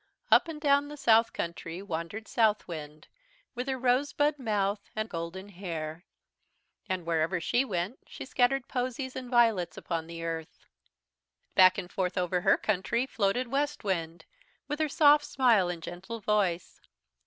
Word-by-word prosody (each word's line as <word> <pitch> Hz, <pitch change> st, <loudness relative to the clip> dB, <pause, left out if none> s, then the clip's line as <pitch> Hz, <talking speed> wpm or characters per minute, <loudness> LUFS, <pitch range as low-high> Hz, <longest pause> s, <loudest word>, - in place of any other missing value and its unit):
"Up 350 Hz, -, +6 dB
and 320 Hz, -2 st, -6 dB
down 285 Hz, -1 st, +3 dB
the 295 Hz, 0 st, -9 dB
south 230 Hz, -3 st, +4 dB
country 170 Hz, 0 st, -5 dB
wandered 190 Hz, +3 st, -5 dB
Southwind, 165 Hz, -9 st, -1 dB, 0.5 s
with 250 Hz, +1 st, -4 dB
her 265 Hz, -1 st, -1 dB
rosebud 285 Hz, +4 st, +1 dB
mouth 205 Hz, -4 st, -1 dB
and 215 Hz, 0 st, -2 dB
golden 180 Hz, +2 st, -6 dB
hair. 170 Hz, -3 st, -6 dB, 0.8 s
And 185 Hz, -2 st, -2 dB
wherever 165 Hz, +2 st, 0 dB
she 240 Hz, +10 st, +1 dB
went 195 Hz, 0 st, -3 dB
she -, -, -8 dB
scattered 260 Hz, 0 st, +1 dB
posies 255 Hz, +1 st, -3 dB
and 255 Hz, -1 st, -6 dB
violets 225 Hz, -9 st, +3 dB
upon 165 Hz, -2 st, -3 dB
the 165 Hz, 0 st, -7 dB
earth. 165 Hz, -1 st, -5 dB, 0.9 s
"Back 185 Hz, 0 st, +6 dB
and 180 Hz, -, -5 dB
forth 185 Hz, 0 st, -2 dB
over 180 Hz, 0 st, 0 dB
her -, -, +4 dB
country 215 Hz, +5 st, 0 dB
floated 235 Hz, +1 st, 0 dB
Westwind 200 Hz, -, -2 dB, 0.4 s
with 295 Hz, +1 st, -3 dB
her 310 Hz, -1 st, +1 dB
soft 295 Hz, -1 st, +5 dB
smile 230 Hz, -9 st, +3 dB
and 170 Hz, -2 st, -5 dB
gentle 190 Hz, +8 st, -7 dB
voice. 200 Hz, -5 st, 0 dB
205 Hz, 145 wpm, -29 LUFS, 175-255 Hz, 0.9 s, Up